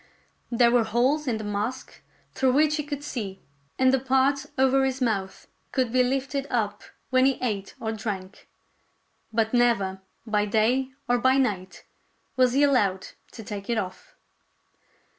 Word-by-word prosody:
There 235 0 +4
were 240 -1 +4
holes 255 +7 +1
in 235 -3 0
the 215 - -6
mask 210 +5 -4 0.3
through 260 -1 +2
which 305 +2 +3
he 300 - -2
could 290 -1 -5
see, 205 -9 -5 0.4
and 260 0 +4
the 265 - +3
part 265 +2 +1
over 265 +1 +4
his 265 0 -1
mouth 205 -6 -2 0.3
could 255 -4 0
be 255 - +4
lifted 270 +2 -1
up 210 -4 -1 0.3
when 255 0 +4
he 270 - +1
ate 205 -6 -3
or 220 - -2
drank; 205 -3 -6 0.8
but 225 0 0
never, 200 -6 +2 0.2
by 210 -2 0
day 235 +5 +2 0.2
or 245 0 +2
by 260 +2 +3
night, 195 -8 -1 0.5
was 255 -2 +3
he 280 +2 +3
allowed 205 -10 +2 0.2
to 225 - -9
take 205 0 -7
it 235 - +1
off. 185 -3 -6
245 Hz, 160 wpm, -25 LUFS, 210-265 Hz, 0.8 s, There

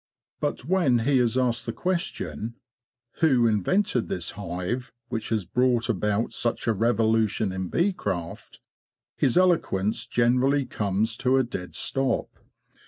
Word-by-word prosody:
But - - -2
when 170 -7 +3
he 140 -1 +3
is 120 0 +2
asked 120 -2 0
the - - 0
question: 170 - -3 0.6
Who 130 -8 +4
invented 120 - +1
this 85 -2 -2
hive 100 +6 -4 0.2
which 110 -2 -3
has 110 -5 0
brought 125 +2 +1
about 105 +1 0
such 120 - -1
a 115 - +2
revolution 110 -2 +1
in 95 0 -3
bee 190 +4 +1
craft? 85 - -5 0.6
his 130 - +2
eloquence 115 - +2
generally 125 +4 +2
comes 105 -1 -1
to 135 0 +2
a 130 - +4
dead 95 -7 -6
stop. 135 -3 -1
120 Hz, 135 wpm, -26 LUFS, 105-130 Hz, 0.6 s, Who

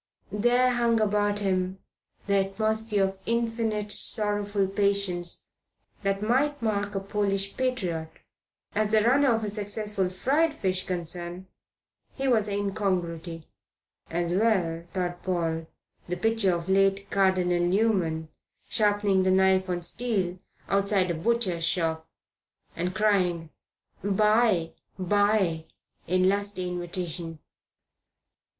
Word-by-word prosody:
There 245 +4 +3
hung 235 -1 +2
about 205 -1 +1
him 185 -1 0 0.5
the 200 0 +2
atmosphere 215 0 0
of 190 0 -2
infinite, 225 -3 -1
sorrowful 205 -2 0
patience 195 -3 -1 0.6
that 195 0 -1
might 280 +6 +1
mark 205 -3 -1
a - - +1
Polish 195 0 -1
patriot. 185 -12 -1 0.6
As 215 0 +1
the 215 0 +4
runner 265 +3 +4
of 225 -1 +1
a - - -1
successful 205 -2 -2
fried 290 - +1
fish 185 -6 -1
concern 175 0 -4 0.7
he 270 0 -2
was 220 -5 +3
an 200 - -2
incongruity. 180 -5 -2 0.6
As 170 +1 -1
well, 185 -5 +1
thought 175 -2 -3
Paul, 165 -3 -1 0.4
picture 200 -1 +1
the 170 +3 -4
late 195 +1 +2
Cardinal 185 -2 +2
Newman 175 -5 +1 0.4
sharpening 205 -2 +2
knife 190 0 +3
on 175 -1 -2
steel 190 -4 -1 0.3
outside 195 -2 +2
a - - 0
butcher's 185 -1 0
shop, 165 -1 0 0.7
and 180 +2 -2
crying, 180 -6 +1 0.5
"buy, 210 -3 +3 0.3
buy," 195 -3 +2 0.4
in 185 +1 +3
lusty 200 -1 0
invitation. 175 -2 -4
195 Hz, 110 wpm, -27 LUFS, 180-215 Hz, 0.7 s, the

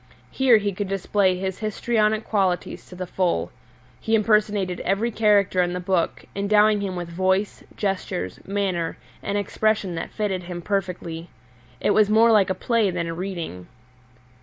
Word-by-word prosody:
Here 260 -4 +5
he 205 -1 -1
could 200 +2 -3
display 195 -1 +1
his 190 0 -4
histrionic 215 0 0
qualities 190 -5 -1
to 180 - -11
the 185 0 -4
full. 180 0 -1 0.5
He 225 - +1
impersonated 210 -4 +1
every 210 +5 0
character 205 -4 +3
in 175 0 0
the 180 - -2
book, 180 -1 -1
endowing 210 +1 +3
him 190 -2 -3
with 175 -1 -4
voice, 190 +4 0
gestures, 185 - -3
manner, 190 -4 -1 0.2
and 200 - -2
expression 205 -1 0
that 165 - -4
fitted 200 -4 -2
him 175 -1 -7
perfectly. 180 -4 -3 0.5
It - - +1
was 210 -1 +4
more 225 +2 +5
like 205 -4 +4
a 190 - 0
play 225 +1 +1
than 175 -2 -2
a 165 - -4
reading. 170 - -5
195 Hz, 160 wpm, -23 LUFS, 180-210 Hz, 0.5 s, Here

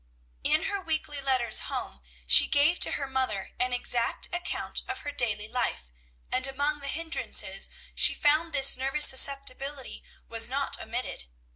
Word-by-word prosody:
In - - +2
her 400 -1 -2
weekly 310 -4 -3
letters 260 -3 0
home 65 - -5 0.2
she - - +6
gave 295 +5 +3
to - - +1
her 280 - -2
mother 260 -7 -2
an 250 0 0
exact 245 -1 -1
account 350 0 -3
of 390 0 -5
her 290 - -5
daily 220 -6 -1
life, 65 - -3 0.4
and 255 +1 0
among 285 +2 -2
the 280 - -7
hindrances 330 +3 -1 0.2
she - - +4
found 310 +3 +2
this 275 -2 +5
nervous 270 +3 +4
susceptibility 275 0 +1 0.2
was 230 0 -2
not 275 +1 -2
omitted. 230 - -5
270 Hz, 150 wpm, -28 LUFS, 245-295 Hz, 0.4 s, she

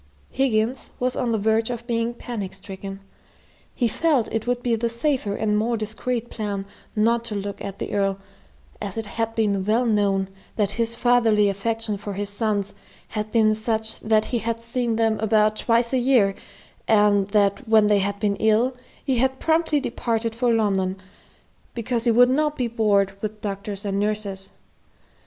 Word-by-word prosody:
Higgins 250 -1 0
was 250 0 0
on 240 - -1
the 225 - +1
verge 220 +2 +1
of 240 -1 -5
being 235 0 -1
panic 210 -6 -5
stricken. 195 0 -8 0.7
He 245 - +2
felt 280 0 +1
it 225 +1 -2
would 245 0 -1
be 240 - +1
the 230 +1 -1
safer 235 -3 -1
and 210 -1 0
more 230 +3 +1
discreet 225 +2 -3
plan 205 -3 -3 0.3
not 230 +2 +2
to 220 -3 -4
look 200 0 -5
at 200 -1 -6
the - - -5
Earl, 195 -1 +1 0.6
as 205 0 -5
it 225 - -2
had 225 +1 -3
been 205 -4 +1
well 220 +5 +2
known 200 -3 +1 0.3
that 205 -2 +1
his 230 +1 0
fatherly 230 -4 +3
affection 215 +1 -2
for 205 0 -6
his 200 +1 -3
sons 205 -1 -1 0.4
had 215 -1 -4
been 220 -2 +4
such 220 0 0
that 215 -1 +2
he 240 - -1
had 230 0 -2
seen 235 0 -2
them 225 -1 +1
about 215 0 +3
twice 235 +1 +2
a 260 - +3
year, 240 -6 +3 0.5
and 205 -2 +4
that 200 +3 +1
when 220 -1 +5
they 210 -1 +4
had 200 +1 -2
been 205 -2 0
ill, 220 +4 +2 0.3
he 265 -3 +1
had 265 +1 +1
promptly 320 -2 +2
departed 230 -3 -2
for 240 +1 +1
London, 195 -4 +1 0.8
because 235 0 -1
he - - +4
would 245 +2 +6
not 300 +2 +1
be 250 - 0
bored 205 -4 +2
with 215 0 -4
doctors 200 0 -5
and 200 0 -1
nurses. 205 -2 -1
220 Hz, 175 wpm, -23 LUFS, 205-235 Hz, 0.8 s, would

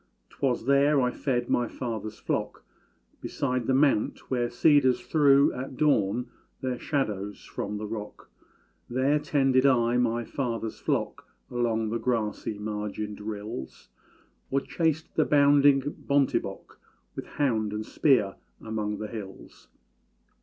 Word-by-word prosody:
'Twas 125 -4 -1
there 140 +2 +4
I 125 -1 +2
fed 120 -4 -1
my 120 -1 +1
father's 110 -4 -5
flock, - - -3 0.6
Beside 125 -3 -2
the 130 - +2
mount 135 -5 +1
where 120 -2 +1
cedars 130 -1 +4
threw 140 +2 +4
At 130 0 -6
dawn 125 -6 +2 0.4
their 130 -2 -2
shadows 105 -8 -3
from 105 +1 -4
the 105 - -5
rock; 105 -1 -7 0.6
There 130 +4 +2
tended 135 -3 +2
I 120 -2 +3
my 120 -1 +1
father's 115 -4 -3
flock - - -2 0.2
Along 115 -3 0
the 115 - -1
grassy 110 -3 -2
margined 105 0 -4
rills, 105 - -7 0.6
Or 135 +1 +1
chased 160 0 -1
the 155 - +3
bounding 145 -1 +5
bontébok 140 -1 -1 0.4
With - - -6
hound 110 -7 +1
and 105 +1 -4
spear 125 -10 +2 0.2
among 105 -1 -3
the 105 - -5
hills. 105 -4 -10
120 Hz, 125 wpm, -27 LUFS, 110-140 Hz, 0.6 s, bounding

